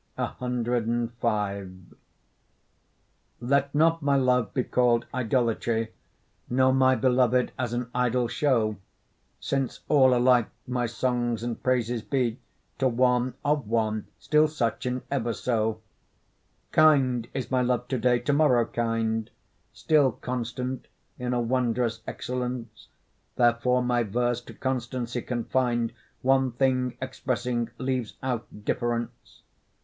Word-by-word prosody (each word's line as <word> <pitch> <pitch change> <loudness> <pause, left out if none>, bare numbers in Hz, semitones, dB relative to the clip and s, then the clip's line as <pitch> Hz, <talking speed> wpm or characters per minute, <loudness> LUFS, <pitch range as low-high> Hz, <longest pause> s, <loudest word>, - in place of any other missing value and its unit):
CV 115 -6 -2 1.5
Let 140 +3 +1
not 165 +2 +3
my 140 -1 +2
love 125 -5 +2
be 130 - 0
call'd 120 -2 +2
idolatry, 115 -2 0 0.6
Nor 130 +1 +3
my 130 0 +4
beloved 125 -1 +2
as 125 -2 -1
an 120 0 -2
idol 125 0 +1
show, 115 -6 +1 0.6
Since 135 -2 -2
all 130 -4 +5
alike 125 -2 +4 0.2
my 125 -1 -1
songs 120 -1 -1
and 120 -1 -4
praises 120 -2 0
be 125 -1 -1 0.4
To 135 - +3
one, 125 0 +2
of 145 -5 +1
one, 110 -1 0
still 150 +1 +3
such, 125 -5 -2
and 125 0 -2
ever 120 -4 0
so. 110 -2 -1 0.9
Kind 135 -7 +4
is 130 -1 -4
my 130 -1 +2
love 125 0 0
to 130 - -1
day, 125 +1 +3
to 145 - 0
morrow 135 -6 +4
kind, 115 -1 -1 0.4
Still 145 -6 +2
constant 125 +1 -4 0.3
in 125 0 -2
a 125 - +1
wondrous 120 -1 0
excellence; 125 -2 -5 0.5
Therefore 125 +1 +3
my 120 -1 +1
verse 120 +2 0
to - - -11
constancy 125 -2 -3
confin'd, 120 -1 -1 0.3
One 130 -1 +3
thing 130 -1 +1
expressing, 125 -2 -2
leaves 130 -3 -2
out 125 -3 -2 0.2
difference. 120 -1 -3
125 Hz, 120 wpm, -26 LUFS, 115-130 Hz, 1.5 s, all